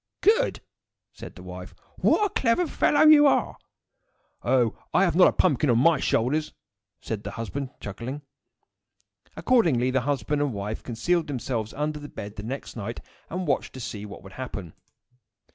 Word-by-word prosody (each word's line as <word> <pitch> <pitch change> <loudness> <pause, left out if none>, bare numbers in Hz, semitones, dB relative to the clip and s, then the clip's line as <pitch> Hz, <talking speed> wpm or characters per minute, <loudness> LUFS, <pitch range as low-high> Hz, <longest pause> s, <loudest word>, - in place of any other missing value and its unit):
"Good!" 455 +5 +3 0.5
said - - -10
the - - -11
wife. - - -9 0.2
"What 420 - +3
a - - 0
clever 245 +8 +2
fellow 300 -1 +3
you 300 -1 +8
are!" - - +2 0.9
"Oh! 120 -2 +2 0.2
I - - +5
have 175 -4 +1
not 180 - +7
a - - +3
pumpkin 150 -5 +2
on 120 - +4
my 150 +4 +4
shoulders!" 145 +8 0 0.5
said 110 -2 -4
the - - -5
husband, 130 +4 -5
chuckling. 120 +8 -6 1.1
Accordingly, 155 - +3
the 130 0 +1
husband 145 +2 -1
and 145 -4 0
wife 105 +2 -4
concealed 165 +9 -1
themselves 120 -5 -3
under 150 +1 -2
the 145 0 -9
bed 105 +1 -8
the 105 - -6
next 130 +6 -6
night, 115 +1 -5 0.3
and 185 +2 -3
watched 140 -4 -1
to 130 - -8
see 105 -3 -6
what 100 - -11
would 95 - -12
happen. 100 -10 -6
135 Hz, 165 wpm, -26 LUFS, 115-170 Hz, 1.1 s, you